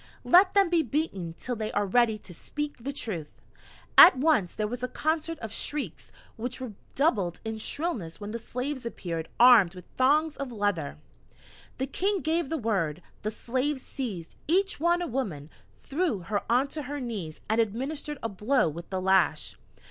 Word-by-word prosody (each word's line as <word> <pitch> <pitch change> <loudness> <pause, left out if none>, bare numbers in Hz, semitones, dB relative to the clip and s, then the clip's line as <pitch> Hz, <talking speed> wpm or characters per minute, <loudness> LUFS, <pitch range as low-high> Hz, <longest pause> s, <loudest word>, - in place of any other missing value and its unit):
"Let 370 +3 +6
them 395 -3 +4
be 340 -2 +4
beaten 240 - -2
till 250 - -3
they 215 -1 -3
are 205 - +1
ready 220 +2 +3
to 195 -3 -12
speak 295 - -5
the 265 +4 -4
truth." 185 - -5 0.6
At 350 - +11
once 265 - +2
there 215 - -1
was 245 +3 -4
a 250 - -1
concert 315 +3 -1
of 225 -4 -7
shrieks, 270 - -4 0.3
which 245 +3 -4
redoubled 220 - -1
in 220 0 -4
shrillness 220 - -3
when 205 0 -6
the 230 - -4
slaves 255 +4 -4
appeared 170 -8 -4
armed 230 -7 +7
with 180 -1 -10
thongs 295 +4 +3
of 275 -2 -4
leather. 205 -9 -1 0.8
The 265 - -1
King 385 +8 0
gave 320 -1 0
the 325 - -1
word: 185 - -1 0.2
the 215 - -1
slaves 260 +5 -2
seized, 200 -12 -5
each 385 +3 +2
one, 345 +2 +2
a - - -3
woman, 180 - -3 0.3
threw 285 - -1
her 200 +3 -1
onto 275 +5 +1
her 290 +1 -5
knees, 205 - -5
and 220 +1 +3
administered 275 +7 -3
a 230 - -1
blow 215 +6 +2
with 165 +3 -6
the 190 - -2
lash. 190 -4 +2
240 Hz, 170 wpm, -28 LUFS, 200-295 Hz, 0.8 s, At